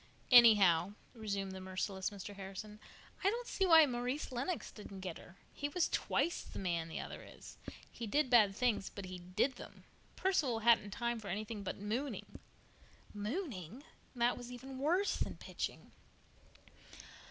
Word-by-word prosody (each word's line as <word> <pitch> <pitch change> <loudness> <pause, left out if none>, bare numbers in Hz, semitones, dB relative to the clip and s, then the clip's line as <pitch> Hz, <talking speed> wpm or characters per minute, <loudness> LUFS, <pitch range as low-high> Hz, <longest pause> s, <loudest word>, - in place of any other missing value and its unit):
"Anyhow," 205 -7 +7 0.2
resumed 200 -4 -3
the 190 0 -7
merciless 190 +1 -2
Mr. 205 0 -8
Harrison, 195 +2 -8 0.4
"I 390 - +5
don't 475 +3 -3
see 385 -4 0
why 325 -2 +9
Maurice 250 +3 -2
Lennox 270 +8 -3
didn't 200 -2 -10
get 180 -3 -5
her. 180 - -15 0.2
He 290 - -3
was 350 +3 +1
twice 345 - 0
the - - -10
man 170 -3 -1
the 165 - -5
other - - -7
is. - - -13 0.3
He 235 - -6
did 280 +3 +1
bad 210 -5 +6
things, 230 -4 +1
but 200 - -8
he 185 0 -7
did 195 +9 0
them. - - -11 0.3
Perceval 285 -12 +1
hadn't 225 -2 +5
time 235 +2 -2
for 210 - -9
anything 210 +3 -4
but 195 - -4
mooning." 230 +8 -4 0.7
"Mooning." 220 - -4 0.3
That 240 0 +2
was 245 0 -8
even 260 +2 -8
worse 350 +8 +2
than - - -3
"pitching!" - - -5
220 Hz, 155 wpm, -35 LUFS, 195-265 Hz, 0.7 s, why